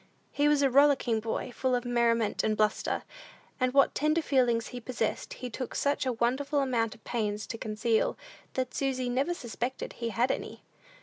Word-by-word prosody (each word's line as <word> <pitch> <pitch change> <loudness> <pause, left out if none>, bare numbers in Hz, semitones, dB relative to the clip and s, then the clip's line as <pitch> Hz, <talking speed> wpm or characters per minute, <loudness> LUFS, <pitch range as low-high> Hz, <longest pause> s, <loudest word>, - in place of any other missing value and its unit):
He 290 +1 +2
was 295 -1 +4
a 275 - +4
rollicking 270 -4 +4
boy, 230 +3 -3
full 255 +1 0
of 245 0 -2
merriment 235 -3 +1
and 215 -1 +1
bluster, 215 0 0 0.6
and 255 -1 +2
what 275 +1 +4
tender 305 +2 +1
feelings 245 -5 +2
he 250 - -6
possessed, 235 -2 -3
he 250 - -6
took 255 +2 -5
such 285 -1 0
a 255 - +1
wonderful 260 +5 0
amount 235 -4 0
of 220 - -22
pains 210 -3 -2
to 230 - -6
conceal, 220 +1 0 0.4
that 255 -1 -1
Susy 260 -2 -1
never 275 +8 0
suspected 245 -1 -4
he 235 -1 -3
had 240 +3 +1
any. - - -5
245 Hz, 180 wpm, -29 LUFS, 230-270 Hz, 0.6 s, was